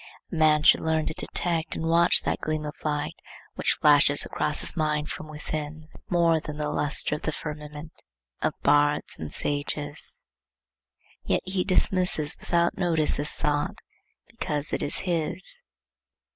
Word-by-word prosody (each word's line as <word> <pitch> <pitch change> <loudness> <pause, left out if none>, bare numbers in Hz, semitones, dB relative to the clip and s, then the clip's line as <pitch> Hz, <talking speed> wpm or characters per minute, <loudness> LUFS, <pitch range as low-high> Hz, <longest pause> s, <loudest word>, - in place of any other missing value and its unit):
A - - -4
man 155 -1 +4
should - - +7
learn 160 -1 0
to - - -2
detect 165 0 -1
and 160 - -3
watch 170 +1 +4
that - - -1
gleam 155 -1 -2
of 150 - -4
light 150 -1 -1 0.4
which - - 0
flashes 145 -1 +5
across 150 0 -2
his - - +2
mind 150 -2 -1
from 155 - -7
within, 155 0 -6 0.2
more 170 -2 +3
than 150 -1 -7
the 150 -1 -2
lustre 150 0 +2
of 150 - -3
the 155 - -1
firmament 150 0 -7 0.5
of - - -1
bards 145 +1 +3
and 80 -2 -6
sages. 145 0 -3 1.0
Yet - - 0
he 185 -1 0
dismisses 180 -4 +2
without 170 0 +1
notice 165 -4 +2
his 145 +1 -2
thought, 145 -2 -1 0.5
because 150 -1 -3
it - - 0
is - - 0
his. 180 - -1
155 Hz, 150 wpm, -26 LUFS, 150-165 Hz, 1.0 s, should